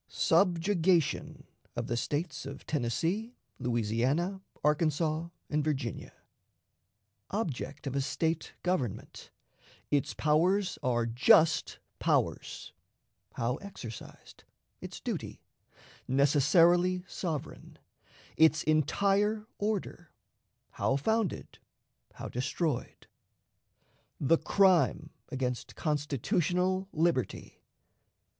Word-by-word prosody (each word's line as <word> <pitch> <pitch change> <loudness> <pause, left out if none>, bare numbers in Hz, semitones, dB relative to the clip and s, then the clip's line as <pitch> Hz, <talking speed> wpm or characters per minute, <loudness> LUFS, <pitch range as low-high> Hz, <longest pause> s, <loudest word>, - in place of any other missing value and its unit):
Subjugation 165 -5 +2 0.3
of 120 -1 -2
the 120 - -2
States 145 +4 -2
of 140 0 -9
Tennessee, 165 - -1 0.2
Louisiana, 125 - 0 0.2
Arkansas, 155 +2 +1 0.2
and 150 0 0
Virginia. 140 -6 -3 1.2
Object 150 - -4
of 135 -1 -3
a 140 - +1
State 160 +4 -1
Government; 180 - -3 0.6
its 145 -2 +1
Powers 175 +6 +2
are 120 -2 +1
"Just 125 +7 +4 0.2
Powers"; - - -1 0.6
how 120 +3 -1
exercised; 125 - -10 0.4
its - - -8
Duty; - - -5 0.6
necessarily 165 +7 +4
sovereign; 160 -6 -5 0.6
its 160 0 +4
Entire 200 +8 +2
Order; 210 -1 -3 0.6
how 135 - 0
founded; 220 +7 -1 0.5
how - - -7
destroyed. 145 +6 -2 1.1
The 160 +4 +3
Crime 190 -3 +3 0.2
against 125 -3 -3
Constitutional 175 +6 0
Liberty. 160 -6 -1
155 Hz, 80 wpm, -30 LUFS, 135-180 Hz, 1.2 s, Just